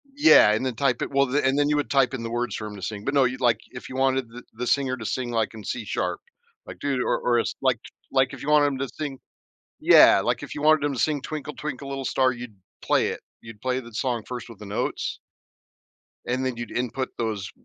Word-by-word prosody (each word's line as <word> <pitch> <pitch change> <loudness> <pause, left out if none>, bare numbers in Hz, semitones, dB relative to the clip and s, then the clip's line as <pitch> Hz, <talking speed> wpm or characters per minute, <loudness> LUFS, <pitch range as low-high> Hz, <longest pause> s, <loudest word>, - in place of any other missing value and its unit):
Yeah, 290 - +7
and 110 +5 0
then 130 - -2
type 135 +1 +1
it - - -2
well, 140 -1 +2
and 135 -1 +2
then 145 0 +3
you 150 - +2
would 145 - -1
type 135 -2 +3
in 130 - -3
the 115 - -4
words 120 +1 -2
for 110 - -5
him 105 - -8
to 100 - -10
sing, 105 +2 -5
but 135 - -1
no, 140 -2 +5
you'd 130 +1 -1
like 120 -3 +3
if 125 - -9
you 130 - -7
wanted 130 -2 +1
the 120 +1 -11
the 120 +2 -4
singer 135 -1 +1
to 110 - -7
sing, 120 +1 -2
like, 115 -1 0
in 110 - -9
C 120 - -4
sharp, - - -2 0.5
like, - - -8
dude 135 -3 -1
or - - +1
or 120 -1 +2
it's - - -2
like - - +2 0.3
like 130 -1 +2
if - - -9
you 150 - -3
want 150 -1 +5
him 135 -2 -2
to 135 - -1
sing 140 -4 -5 0.6
Yeah, - - +7
like - - -1
if - - -7
you 145 - -5
wanted 155 -1 +4
him 145 - 0
to - - -6
sing 150 -2 +1
Twinkle 150 0 -5
Twinkle 140 -2 -6
Little 135 -1 -4
Star, 130 -1 +2
you'd 120 -4 -9 0.3
play - - +2
it. - - -5 0.2
You'd 115 -2 -11
play 130 +1 -1
the 120 -1 -12
song 120 -1 -1
first 125 -1 -6
with 115 -4 -12
the 105 - -10
notes 100 - -3 1.1
and 130 +2 -1
then 130 -2 -2
you'd 120 - -5
input 125 +2 -2
those 110 -5 -3
130 Hz, 255 wpm, -25 LUFS, 115-135 Hz, 1.1 s, Yeah